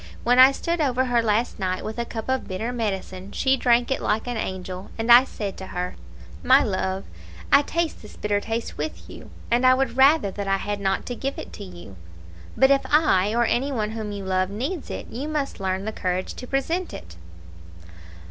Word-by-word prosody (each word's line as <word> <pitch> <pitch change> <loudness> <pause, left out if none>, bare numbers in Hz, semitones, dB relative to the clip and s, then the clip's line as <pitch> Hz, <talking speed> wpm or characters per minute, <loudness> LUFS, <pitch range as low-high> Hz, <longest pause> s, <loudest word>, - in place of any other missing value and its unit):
When 245 +1 +4
I 260 +1 +9
stood 335 +4 -2
over 260 -3 +1
her 245 -2 +2
last 225 +1 0
night 185 -1 -2
with 220 +2 -5
a 235 - -1
cup 225 -2 -6
of 260 0 -1
bitter 215 +5 -3
medicine 195 -4 -4
she 265 0 +2
drank 245 -1 +2
it 265 - 0
like 215 +1 0
an 245 -1 -3
angel, 185 -2 -5
and 225 +1 +1
I 245 +2 +9
said 205 -6 -5
to 190 - -8
her, 180 0 -4 0.5
'My 265 +2 +5
love, 190 -1 -2 0.5
I 280 - +7
taste 330 +2 -2
this 210 - -13
bitter 205 -1 0
taste 225 +2 -4
with 315 - -5
you, - - -11 0.2
and 240 +2 +3
would 255 -1 +3
rather 270 -5 +5
that 200 0 -5
I 195 0 +2
had 205 +1 -3
not 195 -1 -1
to 245 - -4
give 270 +3 -4
it - - -8
to 205 - -8
you; 175 - -11 0.6
but 265 +1 +5
if 275 0 +4
I, 225 - +3
or 240 0 +3
any 265 +5 0
one 215 -5 -2
whom 220 -2 -5
you 200 -1 -6
love, 185 0 0
needs 265 - -4
it, - - -5
you 265 +6 -4
must 300 -5 -3
learn 190 0 -2
the 220 - -2
courage 185 -3 -2
to 250 - -9
present 325 +8 -1
it.' 85 -1 -11
225 Hz, 210 wpm, -24 LUFS, 195-265 Hz, 0.6 s, I